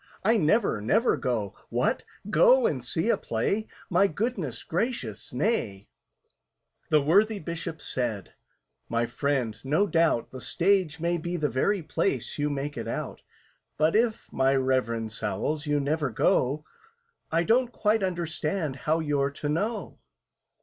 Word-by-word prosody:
I 220 +4 +4
never, 195 - +2
never 220 - +3
go! 115 -6 -2 0.2
What! - - 0 0.3
Go - - +6
and 470 - 0
see - - -1
a - - +4
play? 215 +2 -1 0.2
My 185 +3 +4
goodness 180 - -3
gracious, 170 - -3
nay!" 125 - -1 1.0
The 150 -2 +4
worthy 205 +8 +4
Bishop 165 -3 -6
said, 115 -7 -3 0.6
"My 115 0 +1
friend, 125 -3 -1
no 150 +9 +2
doubt 165 - +1
The 130 - -8
Stage 180 -3 +1
may 170 +1 0
be 175 +2 -3
the 155 - 0
place 135 -2 -1
you 145 0 +1
make 145 +1 -3
it - - -4
out; - - -4 0.6
But 155 +4 +3
if, 225 0 0
my 135 +1 +3
REVEREND 115 -4 0
SOWLS, 145 +7 -2
you 145 0 +2
never 145 0 0
go, 130 +5 +1 0.7
I 165 +1 +2
don't 240 +4 +2
quite 215 -1 +1
understand 170 -4 -2
how 155 +5 0
you're 145 -3 +1
to 145 +1 -5
know." 210 +9 -2
155 Hz, 140 wpm, -27 LUFS, 130-195 Hz, 1.0 s, Go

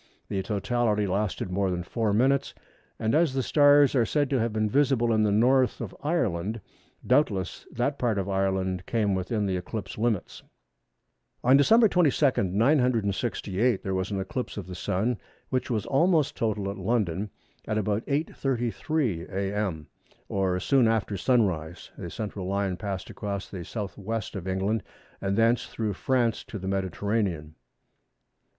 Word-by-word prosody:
The 95 - -1
totality 105 +1 0
lasted 95 -1 -2
more 95 +1 +1
than 90 -1 -2
four 110 +3 -1
minutes, 130 +6 +2 0.4
and 110 0 0
as 155 -3 +3
the 130 - +1
stars 145 0 +5
are 125 -4 +4
said 145 +3 0
to 135 - +2
have 115 0 0
been 110 0 0
visible 125 -1 +2
in 110 - +3
the 105 -1 +3
North 125 +5 +3
of 110 -6 -6
Ireland, 110 - -1 0.5
doubtless 100 - +1
that 140 +4 -1
part 115 -4 +1
of 95 -1 -1
Ireland 95 -2 -1
came 105 -4 +1
within 95 +3 -1
the 95 -2 0
eclipse 100 +2 -6
limits. 110 -4 -1 1.0
On 130 +2 +6
Dec. 220 +12 +6
22, 145 - +3
968, 115 - +1
there 95 - -2
was 95 0 -1
an 100 -2 -2
eclipse 110 +7 -4
of 100 - -4
the 90 - -8
Sun, 100 +6 -1 0.3
which 130 - -1
was 110 -5 -1
almost 160 +1 +2
total 105 -3 -1
at 100 - -8
London 105 -4 0 0.4
at 110 - 0
about 105 +1 0
8h. 145 +3 0
33m. 120 - -1
a.m., 95 -5 -2 0.4
or 95 -2 0
soon 130 +4 +3
after 110 -2 0
sunrise. 95 -8 0
The 85 - -7
central 100 -2 -5
line 100 -1 0
passed 95 -1 -5
across 100 -1 -4
the 95 - -7
S. 85 - -9
W. 105 -2 -5 0.3
of 95 -2 -6
England, 95 +4 0 0.4
and 100 +1 -1
thence 115 +1 +3
through 110 -2 -3
France 120 +1 0
to 105 - -7
the 95 -1 -6
Mediterranean. 95 -4 -1
105 Hz, 155 wpm, -27 LUFS, 95-125 Hz, 1.0 s, On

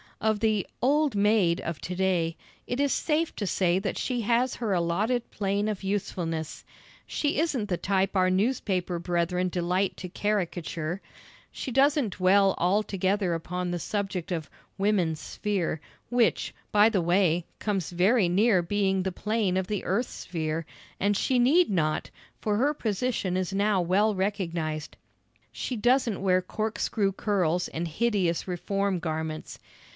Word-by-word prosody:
Of 220 -1 +1
the 215 -3 +1 0.2
"old 290 0 +3
maid" 200 -4 +3
of 170 -3 -4
to 180 - -4
day, 175 -3 +1 0.3
it 245 - -2
is 285 -1 +2
safe 320 +1 0
to 205 - -2
say 180 -1 +2
that 195 - -3
she 245 -2 -1
has 240 +3 +1
her 225 -4 -2
allotted 200 +8 0
plane 200 +1 -1
of 210 -3 -3
usefulness. 175 -5 -3 0.4
She 295 -1 0
isn't 270 -10 0
the 180 - 0
type 195 +1 0
our 185 -1 +4
newspaper 185 -3 0
brethren 175 +1 0
delight 180 +2 0
to 180 - -6
caricature. 175 -4 -2 0.5
She 265 - -5
doesn't 270 - +3
dwell 195 +1 +4
altogether 195 0 +1
upon 180 +2 -3
the 175 - -2
subject 195 -1 -3
of 160 -4 -3 0.3
"woman's 190 -6 +1
sphere," 185 -4 -2 0.3
which, 245 -2 +2 0.2
by 210 +1 +6
the 200 -5 +1
way, 175 -1 +2
comes 195 -6 -2
very 185 +3 +3
near 195 +1 +4
being 195 +1 +1
the 190 - -1
plane 210 0 0
of 190 -1 -1
the 210 -2 -2
earth's 215 +7 0
sphere, 160 -1 -3 0.3
and 205 0 +2
she 255 - +1
need 310 +9 +4
not, 155 -6 0 0.3
for 210 -1 0
her 280 +6 +2
position 215 -5 -1
is 185 0 -2
now 200 -1 +2
well 200 +5 +2
recognised. 170 -6 -2 0.5
She 255 - -4
doesn't 240 -2 +2
wear 185 -1 +3
corkscrew 215 0 -1
curls 180 -4 0
and 170 +2 -4
hideous 190 -1 0
reform 195 +2 -1
garments. 160 -1 -4
195 Hz, 150 wpm, -27 LUFS, 175-215 Hz, 0.5 s, by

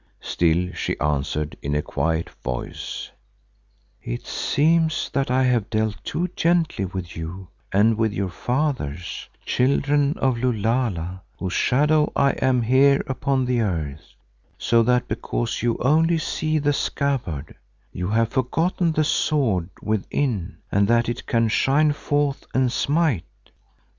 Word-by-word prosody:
Still 85 +2 0
she - - -3
answered 75 +1 -1
in 70 +1 -2
a 75 - 0
quiet 80 0 -1
voice, 60 -1 -5 0.9
"It - - -5
seems 160 +2 +1
that 135 -2 0
I 130 +1 +3
have 120 -5 +1
dealt 110 -1 -1
too 175 +2 -1
gently 165 - +1
with 90 -1 -6
you 85 +3 -7 0.2
and 110 +3 +3
with 110 -1 +2
your 100 -3 -2
fathers, 120 - -2 0.2
Children 140 +3 +2
of 130 -3 +1
Lulala, 110 -7 -1 0.2
whose 95 -1 -3
shadow 150 +3 +3
I 140 -1 +4
am 125 -2 +1
here 135 +4 +4
upon 135 0 0
the 125 -1 +1
earth, 80 -8 -3 0.4
so 115 0 +3
that 125 +1 +2
because 120 -1 -2
you 120 0 +1
only 160 +5 +3
see 155 0 -1
the 145 -1 +1
scabbard, 120 - -2 0.4
you 90 0 -4
have 110 +2 +2
forgotten 165 +7 0
the 155 - +2
sword 125 - +1
within 110 - -1
and 100 0 +3
that 120 0 +3
it 120 - -5
can 115 -1 +2
shine 140 +7 +3
forth 145 -1 -1
and 130 -1 +3
smite. 140 - -1
120 Hz, 135 wpm, -23 LUFS, 95-140 Hz, 0.9 s, I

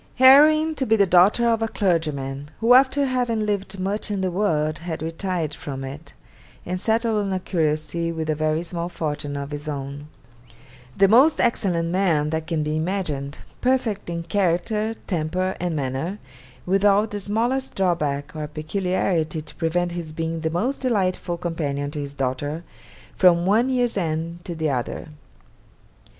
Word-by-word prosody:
'Heroine 305 +5 +7
to 275 -3 -2
be 220 - +4
the 200 -2 +4
daughter 190 +6 +5
of 225 -1 +2
a 225 - +1
clergyman, 150 -9 -1
who 230 +2 +5
after 270 +2 +5
having 245 -4 0
lived 200 -2 -2
much 200 +4 -2
in 200 -2 -1
the 185 -1 0
world 155 -5 0
had 165 -2 -5
retired 165 -1 -2
from 135 -3 -6
it, 140 +4 -9 0.5
and 180 +1 -3
settled 225 -1 +1
on 195 - -2
a 190 - 0
curacy 160 -1 -1
with 160 -1 -4
a 155 - +2
very 155 +2 0
small 170 0 -4
fortune 145 -4 -4
of 140 +1 -5
his 145 +1 -6
own. 140 0 -5 0.9
The 195 - +6
most 260 +10 +5
excellent 185 -8 +1
man 170 -5 +1
that 160 0 -2
can 160 -3 -1
be 150 0 -1
imagined, 155 -5 -2 0.2
perfect 245 -7 0
in 170 0 -3
character, 205 +4 0
temper, 185 +2 -1
and 175 -2 -2
manner, 140 +7 -2 0.5
without 200 +3 +3
the 205 - -3
smallest 235 +7 -1
drawback 150 -6 -1
or 155 -1 -4
peculiarity 160 0 -1
to - - -12
prevent 175 +1 0
his 170 -3 -5
being 165 +1 -3
the 160 0 -1
most 225 - -1
delightful 190 -8 0
companion 145 -5 -3
to 150 - -5
his 140 -1 -6
daughter 145 +4 -2 0.5
from 175 -2 +5
one 220 +7 +3
year's 245 -4 +1
end 165 0 -2
to 170 - -5
the 160 -2 0
other. 125 +4 -3
175 Hz, 165 wpm, -23 LUFS, 155-205 Hz, 0.9 s, Heroine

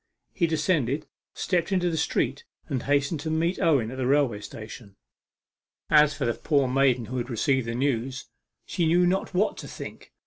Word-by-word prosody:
He 170 -3 +1
descended, 155 -3 0 0.3
stepped 180 0 0
into 180 -2 +1
the - - -2
street, 160 - 0 0.2
and 135 -6 -2
hastened 145 +3 +1
to 160 +2 -4
meet 165 +3 0
Owen 135 -9 +2
at 130 - -7
the 130 -1 -1
railway 135 -6 +2
station. 110 -1 -10 1.0
As 150 -1 +6
for - - -2
the 120 - +1
poor 140 0 +1
maiden 130 -2 +2
who 130 +3 -5
had 120 +1 -3
received 130 +1 +1
the 115 - -2
news, 130 0 -1 0.4
she 170 -3 0
knew 175 +2 +4
not 185 +1 0
what 205 +4 +1
to - - -8
think. - - -9
140 Hz, 180 wpm, -26 LUFS, 125-165 Hz, 1.0 s, As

